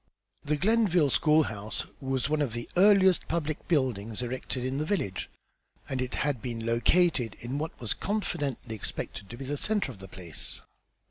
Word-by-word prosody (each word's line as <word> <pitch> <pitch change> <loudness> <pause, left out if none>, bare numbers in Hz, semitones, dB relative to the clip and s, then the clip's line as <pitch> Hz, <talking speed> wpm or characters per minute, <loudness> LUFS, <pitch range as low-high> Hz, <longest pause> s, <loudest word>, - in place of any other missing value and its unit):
The 150 +1 +1
Glenville 185 - +3
school 155 +2 +5
house 105 -4 -3
was 135 -1 0
one 155 0 +1
of 135 -6 0
the 120 0 -4
earliest 190 -1 +6
public 155 -2 -2
buildings 125 - 0
erected 125 +1 -3
in 130 +2 -1
the - - +1
village, 155 - -1 0.6
and 130 -1 -2
it 125 -1 -2
had 140 -6 0
been 115 -2 -4
"located" 120 - +3
in 125 +4 -3
what 160 +2 -4
was 115 -4 -1
confidently 145 - -2
expected 100 -2 -5
to 120 - -8
be 135 - -6
the 145 +2 -2
centre 210 -4 0
of 105 - -13
the 95 - -9
place. 85 -4 -6
135 Hz, 175 wpm, -29 LUFS, 115-160 Hz, 0.6 s, earliest